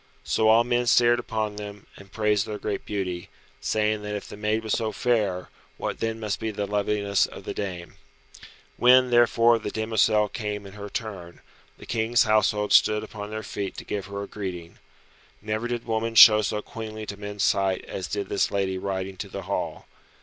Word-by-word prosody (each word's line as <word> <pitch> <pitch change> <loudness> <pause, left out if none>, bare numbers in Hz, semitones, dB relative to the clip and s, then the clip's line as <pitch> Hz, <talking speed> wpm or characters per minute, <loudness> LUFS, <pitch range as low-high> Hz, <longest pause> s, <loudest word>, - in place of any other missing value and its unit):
So 110 - +1
all 110 +2 +6
men 120 0 0
stared 120 0 +5
upon 110 -3 -3
them, 105 -1 -8
and 100 -1 -15
praised 105 -2 +1
their 105 - -4
great 105 -1 -4
beauty, 90 -4 -3 0.3
saying 105 +9 0
that 105 0 -4
if 105 - -6
the - - -9
maid 105 +2 -1
was 110 - -1
so 110 -2 0
fair, 105 -7 0 0.3
what - - -4
then 115 0 -2
must 105 -3 -2
be 110 - -2
the 105 -1 -3
loveliness 100 0 +1
of - - -11
the - - -5
dame. 90 -4 -6 0.8
When, 125 +1 +6
therefore, 120 -1 +5
the 105 - -4
demoiselle 110 -1 +2
came 105 -2 -4
in 95 - -11
her 105 -1 -8
turn, 95 -6 -6 0.4
the - - -12
King's 115 +1 +2
household 105 -1 +2
stood 105 0 +5
upon 105 -1 -7
their 110 0 -5
feet 100 -1 -5
to - - -6
give 100 -2 -4
her 100 0 -5
greeting. 90 -5 -7 0.6
Never 110 +3 -3
did 120 -1 -3
woman 115 0 -2
show 110 -1 +10
so 105 0 -2
queenly 110 -1 -7
to 100 - -6
men's 105 0 -4
sight 95 -2 +1
as 95 -3 -5
did 100 +1 -3
this 100 - +1
lady 95 -1 -1
riding 95 0 -4
to - - -6
the - - -6
hall. - - -3
105 Hz, 190 wpm, -25 LUFS, 100-110 Hz, 0.8 s, show